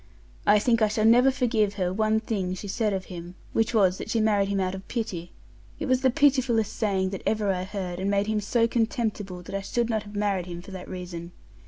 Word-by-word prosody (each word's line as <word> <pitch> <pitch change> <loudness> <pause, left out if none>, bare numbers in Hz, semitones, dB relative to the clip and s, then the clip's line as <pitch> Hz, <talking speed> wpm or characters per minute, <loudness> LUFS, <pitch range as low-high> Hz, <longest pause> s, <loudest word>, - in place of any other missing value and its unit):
I 210 +1 +7
think 230 +2 +2
I 215 - +5
shall 215 +1 0
never 245 +4 +6
forgive 225 -6 +1
her 180 -2 -1
one 215 +2 +2
thing 190 -5 -2
she 200 - -7
said 210 +2 0
of 190 -2 -2
him, 175 0 -8 0.2
which 225 0 +2
was 190 -5 +3
that - - -6
she 225 - +1
married 205 -2 +2
him 200 -1 0
out 185 -1 0
of 190 0 -8
pity; 185 -8 -4 0.5
it 305 - -3
was 255 -2 +2
the 260 - +4
pitifullest 250 -5 +2
saying 190 -4 0
that 195 - -5
ever 210 -3 +1
I 180 0 -3
heard, 185 -3 -5
and 195 +1 -1
made 200 0 +2
him 215 0 0
so 230 +3 +2
contemptible 220 -5 -2
that - - -9
I 195 - -1
should 235 +4 -1
not 220 -1 0
have 205 0 -11
married 200 -3 0
him 175 -1 -7
for 195 - -11
that 185 -1 -8
reason. 175 -2 -7
205 Hz, 235 wpm, -26 LUFS, 190-225 Hz, 0.5 s, I